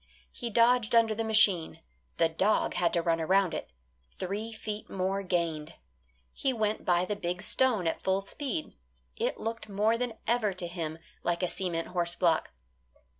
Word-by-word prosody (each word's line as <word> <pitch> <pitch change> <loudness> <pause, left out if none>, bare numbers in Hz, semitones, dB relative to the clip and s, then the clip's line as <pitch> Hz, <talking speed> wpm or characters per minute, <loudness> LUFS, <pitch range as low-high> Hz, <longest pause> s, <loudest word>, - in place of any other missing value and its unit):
He 235 - -5
dodged 235 +1 +3
under 225 -1 +5
the 225 +1 -2
machine; 215 -7 +3 0.4
the 165 - +4
dog 185 +6 +1
had 170 -1 +1
to 170 - +1
run 165 -1 +1
around 185 +1 +3
it; - - -4 0.5
three 205 +5 -3
feet 215 -1 -6
more 195 +1 -1
gained. 170 -4 -2 0.6
He 270 - 0
went 215 -2 -1
by 175 0 +2
the 210 - -2
big 180 -1 -3
stone 230 -4 +2
at 165 - -1
full 190 +1 +1
speed, 225 - -4 0.4
it - - -2
looked 225 -1 -4
more 215 +3 +2
than 245 -2 -1
ever 220 -3 +1
to 180 -1 -2
him 165 -3 -4 0.2
like 175 +1 -1
a - - +3
cement 170 -2 -2
horse 175 -1 +1
block. 165 -3 +2
195 Hz, 170 wpm, -29 LUFS, 175-220 Hz, 0.6 s, under